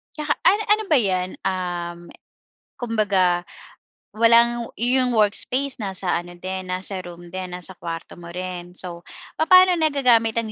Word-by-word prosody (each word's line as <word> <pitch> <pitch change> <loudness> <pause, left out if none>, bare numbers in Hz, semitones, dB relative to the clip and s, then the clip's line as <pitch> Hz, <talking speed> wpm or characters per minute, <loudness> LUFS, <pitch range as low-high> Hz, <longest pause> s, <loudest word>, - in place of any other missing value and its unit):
Tsaka 300 -1 -1
ano 405 +3 +4
ano 430 +1 +4
ba 310 - +4
'yan? 185 -4 0
Um, 175 -2 -3 0.8
kumbaga 200 -7 +1 0.7
walang 235 +1 +4
yung 250 +1 +2
workspace 250 +6 +1
nasa 190 -3 -2
ano 175 0 -10
din, 185 0 -5
nasa 185 +1 -3
room 175 0 -11
din, 185 -1 -6
nasa 180 +1 -6
kuwarto 165 -1 -7
mo 170 - -11
rin? 180 -1 -6
So, 175 -2 -8 0.4
papaano 365 +3 +6
nagagamit 250 -8 +3
ang 220 -2 -4
195 Hz, 135 wpm, -22 LUFS, 180-245 Hz, 0.8 s, papaano